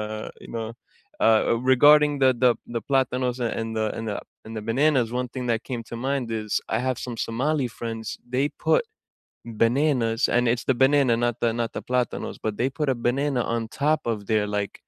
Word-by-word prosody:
uh, 110 0 -5
you - - -12
know 115 -1 -3 0.5
uh, 110 -1 +5
a 115 - +2 0.2
regarding 150 +2 +6
the 130 - +7
the 125 - +7 0.2
the 115 - -2
plátanos, 130 -2 +1
a 120 - +1
and 115 0 -3
the 110 - +1
and 115 - -5
the 105 - -2 0.3
and 110 0 -7
the 105 - -4
bananas, 130 0 +3
one 125 - -4
thing 125 -2 -4
that 115 -1 0
came 120 -3 -3
to 115 - -5
mind 135 -3 0 0.2
is, 105 - -11 0.2
I 110 - 0
have 130 - -1
some 120 - -5
Somali 135 +3 0
friends, 115 -1 -5 0.3
they 135 +2 +3 0.2
put - - +5 0.8
bananas 120 -2 +2
and 120 - +4
it's 120 - -3
the 130 - +2
banana 135 -3 +4
not 120 -1 0
the 115 -1 +2
not 115 - -1
the - - -4
plátanos, 125 -2 -2
but 110 - -1
they 125 - +2
put 140 +2 -2
a 130 - +3
banana 135 0 0
on 115 - 0
top 150 +6 +1
of 110 - -3
their, 105 -1 +2
like, 100 -1 -3
120 Hz, 210 wpm, -25 LUFS, 115-135 Hz, 0.8 s, the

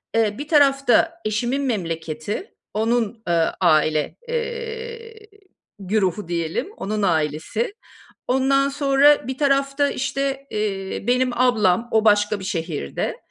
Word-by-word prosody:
eee, 215 -2 +1
bir 290 +2 -6
tarafta 285 +2 +3
eşimin 240 +6 0
memleketi, 165 - -3 0.2
onun, 225 0 0
eee, 165 -1 +2
aile, 155 -3 +2
eee, 460 -1 -5 0.5
güruhu 195 -1 -1
diyelim, 170 - -2
onun 210 +2 -3
ailesi, 160 - -1 0.5
ondan 275 +2 +2
sonra 280 -1 +3
bir 265 - -4
tarafta 275 0 +2
işte, 275 +1 -2
eee, 195 -3 -3
benim 250 +1 +2
ablam, 230 -4 +3
o 220 0 +2
başka 210 0 +3
bir 190 - -8
şehirde, 160 - -3
235 Hz, 115 wpm, -22 LUFS, 190-275 Hz, 0.5 s, tarafta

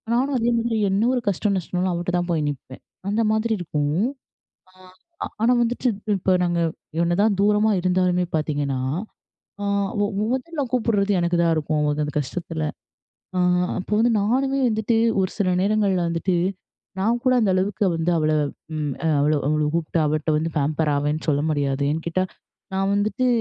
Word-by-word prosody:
நானும் 270 +2 +1
அதே 235 +1 +1
மாரி 230 -1 -1
என்ன 200 +3 +2
ஒரு 245 - 0
கஷ்ட, 200 +2 0
நஷ்டம்னாலும் 180 0 -1
அவகிட்ட 175 +1 -2
தான் 175 0 -2
போய் 155 -2 +1
நிப்பேன். 130 -2 -8 0.3
அந்த 220 +3 +1
மாதிரி 220 +1 +1
இருக்கும். 155 +3 0 0.7
ஆ - - -27 0.7
ஆனா, 240 +2 +4
வந்துட்டு 245 +2 0 0.3
இப்போ 185 +1 +1
நாங்க 175 -1 0 0.4
என்னதான் 195 +4 +2
தூரமா 210 +1 +3
இருந்தாலுமே 180 0 +2
பாத்தீங்கன்னா, 145 -4 -1 0.8
அ - - -1 0.4
ஒ - - +3 0.3
மொதல்ல 290 +4 -2
கூப்பிடுறது 215 -5 +1
எனக்குதான் 170 -1 +2
இருக்கும். 155 0 0 0.2
அந்த 150 - -5
கஷ்டத்துல, 160 +2 -4 0.7
அ - - +1 0.4
அப்போ 185 - -6
வந்து 235 +1 +3
நானுமே 270 +6 +1
வந்துட்டு 220 +1 0 0.3
ஒரு 185 - -1
சில 195 -3 +1
நேரங்கள்ல 200 -3 +2
வந்துட்டு, 170 +2 0 0.6
நான் 230 +5 +2
கூட 255 0 +4
அந்த 210 - +2
அளவுக்கு 200 +3 0
வந்து 165 +2 0
அவள 155 0 +1 0.5
ம் 145 -3 -2 0.2
அவள 150 +2 +3 0.2
அவள 150 0 +1
கூப்ட்டு 170 0 -1
அவள்ட்ட 155 +1 0
வந்து 165 +1 -2
பாம்பர் 150 +2 0
ஆவேன்னு 150 +2 -1
சொல்ல 145 -1 +2
முடியாது. 140 -2 0
ஏன்னு 160 +2 -2
கேட்டா, 185 +2 0 0.5
நான் 195 +1 +1
வந்துட்டு 215 +5 0
180 Hz, 155 wpm, -23 LUFS, 155-215 Hz, 0.8 s, ஆனா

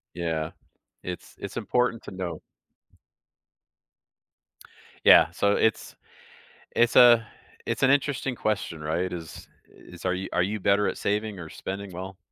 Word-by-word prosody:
Yeah, 80 -2 -2 0.5
it's, 90 -1 -7
it's - - -7
important 125 -2 0
to - - -9
know. 95 -2 -5 2.6
Yeah, - - +8
so 100 0 +1
it's 110 -2 0 0.8
It's 120 0 +3
a 120 -2 +7 0.4
it's - - -2
an 135 - +5
interesting 140 -2 0
question, 100 -8 -2
right? 85 +4 -2
Is 85 -3 -8 0.2
is, 90 -1 -14
are 90 - +1
you 95 +1 -4
are - - +2
you 105 +4 -1
better 100 +2 +2
at - - -3
saving 105 0 -2
or 80 -2 -8
spending 100 +1 -6
well? 95 +2 -8
95 Hz, 135 wpm, -26 LUFS, 90-110 Hz, 2.6 s, Yeah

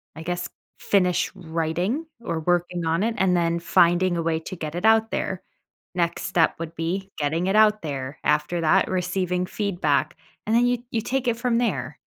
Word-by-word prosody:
I 160 - -8
guess, 175 +1 -3 0.3
finish 180 -3 +1
writing, 175 - -2 0.2
or 170 -8 -3
working 175 0 0
on 165 +5 +1
it, 225 0 0
and 185 -1 +3
then 170 0 +1
finding 175 +1 +3
a - - 0
way 160 -1 0
to 185 - -7
get 155 -1 -6
it 180 - -2
out 225 0 +4
there. 190 -2 -2 0.5
Next 170 -1 0
step 170 -2 +2
would 165 0 -6
be 190 +4 -3
getting 160 +5 0
it 195 - +1
out 215 0 +5
there. 140 -2 -4
After 150 +3 +1
that, 180 +4 +3
receiving 180 0 -1
feedback. 175 -8 -1 0.3
And 220 - +1
then 240 +1 +4
you 245 -1 +1
you 225 - 0
take 265 +2 -2
it 230 -1 +1
from 235 -1 +1
there. 240 - -2
175 Hz, 190 wpm, -24 LUFS, 165-200 Hz, 0.5 s, out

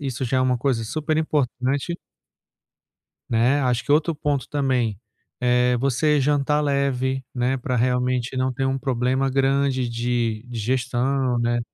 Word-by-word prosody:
isso 130 -2 -3
já 130 +2 0
é - - +2
uma 130 -1 +2
coisa 120 -3 0
super 155 +5 -2
importante 145 +1 -1 1.3
né, 120 +5 +3
acho 125 -3 0
que 145 - +1
outro 160 +2 +2
ponto 145 -4 -2
também 130 -8 0 0.4
é 125 0 +3
você 140 +4 +2
jantar 145 +1 +1
leve, 135 -2 0
né, 125 +2 0
pra 125 0 -2
realmente 125 +1 0
não 130 0 0
ter 135 +1 -2
um 135 0 0
problema 130 0 0
grande 135 -1 +1
de 120 -2 -1
digestão, 125 +2 0
né, 120 0 +1
130 Hz, 145 wpm, -23 LUFS, 125-140 Hz, 1.3 s, né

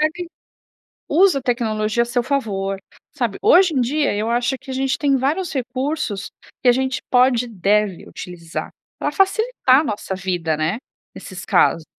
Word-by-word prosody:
ele. 355 -1 -6 0.8
Usa 360 -1 +4
a - - -9
tecnologia 225 -2 0
a - - +1
seu 240 +1 0
favor, 205 -7 -2 0.3
sabe? 240 -8 -2
Hoje 385 -5 +5
em 270 - +1
dia, 280 +3 +1
eu 215 +2 -1
acho 240 +2 0
que 265 0 -9
a - - -4
gente 265 0 0
tem 280 -2 +2
vários 305 +7 -1
recursos, 260 -4 -3 0.3
que 255 - +2
a - - +8
gente 260 +1 -1
pode 250 -1 +4
e - - -9
deve 205 -2 0
utilizar 170 -2 -7 0.3
pra - - -2
facilitar 390 - +3
a - - -6
nossa 205 -6 -4
vida 175 -4 -1
né, 160 +7 -1 0.4
nesses 185 -1 -9
casos. 165 - +3
245 Hz, 170 wpm, -20 LUFS, 205-275 Hz, 0.8 s, a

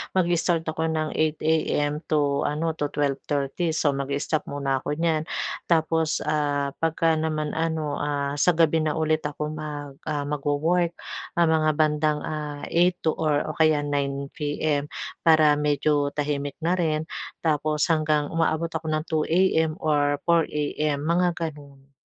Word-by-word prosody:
mag-i-start 175 -2 +2
ako 160 0 -1
ng 155 -1 -1
8 155 -1 +1
AM 150 -2 +1
to 145 -2 +1
ano, 160 +3 -1
to 145 - +1
12:30. 145 +3 -1
So, 155 -2 +2
mag-i-stop 140 +3 -2
muna 135 -1 -1
ako 145 - -3
niyan. 160 -1 0 0.4
Tapos, 160 -1 +1
ah, 145 -2 0
'pagka 165 0 +2
naman 155 -1 -1
ano, 160 -2 -1
ah, 140 -1 -1
sa 180 +3 +4
gabi 165 -1 +3
na 155 -1 0
ulit 155 0 +1
ako 150 +1 -4
mag 150 -2 -6 0.2
ah, 145 -1 -1
magwo-work. 150 +4 0 0.4
Ah, 170 - +5
mga 160 -1 +3
bandang, 150 -1 +2
ah, 150 -2 -5
8 175 +2 +3
to 160 - +3
or 150 -2 0
o - - -9
kaya 155 -1 +3
9 140 -1 -1
PM 145 -1 -1 0.3
para 155 -2 +6
medyo 145 0 +1
tahimik 145 -1 -2
na 175 - +3
rin. 160 -3 0 0.4
Tapos 150 -1 +1
hanggang 155 -1 +1
umaabot 165 0 +1
ako 160 0 -4
ng 155 0 0
2 155 -3 0
AM 160 -2 +2
or 145 -4 +1
4 170 -1 +3
AM, 150 0 -1
mga 175 +1 +2
gano'n. 145 -4 -7
155 Hz, 150 wpm, -25 LUFS, 145-160 Hz, 0.4 s, para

